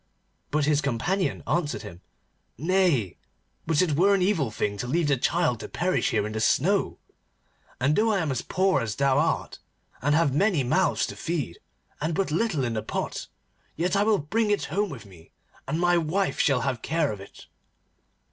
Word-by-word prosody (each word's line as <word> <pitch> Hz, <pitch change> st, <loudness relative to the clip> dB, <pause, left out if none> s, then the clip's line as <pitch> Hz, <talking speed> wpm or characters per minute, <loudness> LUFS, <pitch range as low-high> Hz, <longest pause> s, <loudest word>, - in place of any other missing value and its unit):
But 150 Hz, 0 st, +1 dB
his 150 Hz, -1 st, +2 dB
companion 160 Hz, +9 st, -1 dB
answered 145 Hz, -11 st, -1 dB
him: 85 Hz, +1 st, -10 dB, 0.6 s
'Nay, 165 Hz, -, +1 dB, 0.5 s
but 160 Hz, +2 st, +3 dB
it 155 Hz, -5 st, 0 dB
were 195 Hz, +6 st, +4 dB
an 195 Hz, -, 0 dB
evil 175 Hz, -, +1 dB
thing 105 Hz, -1 st, -2 dB
to 125 Hz, -, -3 dB
leave 160 Hz, +4 st, +1 dB
the 140 Hz, -, +4 dB
child 145 Hz, -1 st, +1 dB
to -, -, -7 dB
perish 180 Hz, +1 st, 0 dB
here -, -, 0 dB
in 105 Hz, -, -4 dB
the 110 Hz, -, -2 dB
snow, 185 Hz, -, +2 dB, 0.8 s
and 140 Hz, +4 st, +2 dB
though 220 Hz, +1 st, +3 dB
I 205 Hz, -, +2 dB
am 160 Hz, -6 st, -1 dB
as 130 Hz, -, -1 dB
poor 190 Hz, -5 st, +1 dB
as 110 Hz, -3 st, -3 dB
thou 140 Hz, 0 st, +2 dB
art, 160 Hz, -, -1 dB, 0.4 s
and 145 Hz, +3 st, +2 dB
have 160 Hz, -4 st, +2 dB
many 180 Hz, -2 st, +2 dB
mouths 185 Hz, +10 st, +2 dB
to -, -, -7 dB
feed, 155 Hz, -, -3 dB, 0.4 s
and 160 Hz, +2 st, -1 dB
but 195 Hz, -3 st, 0 dB
little 165 Hz, -, 0 dB
in 120 Hz, -2 st, -1 dB
the 110 Hz, -, -2 dB
pot, 110 Hz, -, -4 dB, 0.5 s
yet 175 Hz, +3 st, -1 dB
will 205 Hz, +1 st, +3 dB
I -, -, -4 dB
bring 215 Hz, +9 st, 0 dB
it 205 Hz, -, +1 dB
home 205 Hz, +2 st, +1 dB
with 130 Hz, -8 st, -9 dB
me, 90 Hz, -5 st, -17 dB, 0.3 s
and 155 Hz, +4 st, -1 dB
my 175 Hz, 0 st, +3 dB
wife 180 Hz, +5 st, -1 dB
shall 135 Hz, -4 st, +3 dB
have 125 Hz, -3 st, -2 dB
care 160 Hz, -3 st, 0 dB
of 105 Hz, -2 st, -7 dB
it. 100 Hz, -, -13 dB
155 Hz, 195 wpm, -26 LUFS, 125-185 Hz, 0.8 s, were